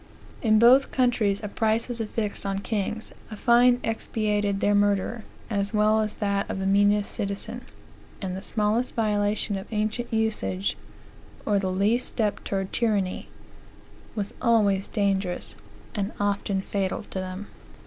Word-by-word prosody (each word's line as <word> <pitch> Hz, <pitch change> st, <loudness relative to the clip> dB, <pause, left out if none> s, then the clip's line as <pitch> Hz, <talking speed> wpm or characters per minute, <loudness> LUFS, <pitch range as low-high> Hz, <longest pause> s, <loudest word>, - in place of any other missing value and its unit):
In 215 Hz, -2 st, +4 dB
both 250 Hz, +5 st, +6 dB
countries, 225 Hz, -6 st, +1 dB
a -, -, -2 dB
price 220 Hz, +2 st, +1 dB
was 240 Hz, -2 st, -2 dB
affixed 215 Hz, -1 st, -2 dB
on 195 Hz, -1 st, -1 dB
kings, 210 Hz, +1 st, -3 dB, 0.2 s
a 215 Hz, -, -6 dB
fine 245 Hz, +2 st, +5 dB
expiated 210 Hz, -3 st, -1 dB
their 205 Hz, -, +2 dB
murder, 205 Hz, +2 st, +1 dB, 0.2 s
as 200 Hz, -1 st, -1 dB
well 215 Hz, +1 st, +4 dB
as 215 Hz, -1 st, -2 dB
that 200 Hz, -1 st, -1 dB
of -, -, -3 dB
the 190 Hz, -, -2 dB
meanest 205 Hz, +1 st, +3 dB
citizen; 205 Hz, +4 st, -4 dB, 0.6 s
and 185 Hz, -2 st, -3 dB
the 190 Hz, -, -5 dB
smallest 215 Hz, +4 st, 0 dB
violation 210 Hz, -2 st, 0 dB
of 190 Hz, -, -10 dB
ancient 215 Hz, +3 st, -1 dB
usage, 220 Hz, -4 st, 0 dB, 0.7 s
or 205 Hz, -2 st, +2 dB
the 190 Hz, -1 st, -1 dB
least 210 Hz, +6 st, +1 dB
step 215 Hz, -4 st, -1 dB
towards 195 Hz, -1 st, -2 dB
tyranny, 205 Hz, -5 st, 0 dB, 0.9 s
was 205 Hz, -2 st, -3 dB
always 205 Hz, -5 st, +3 dB
dangerous, 195 Hz, -4 st, -1 dB, 0.4 s
and 205 Hz, -1 st, -2 dB
often 200 Hz, -1 st, 0 dB
fatal 195 Hz, -2 st, -2 dB
to 190 Hz, -, -6 dB
them." 185 Hz, +2 st, -5 dB
210 Hz, 145 wpm, -26 LUFS, 200-225 Hz, 0.9 s, both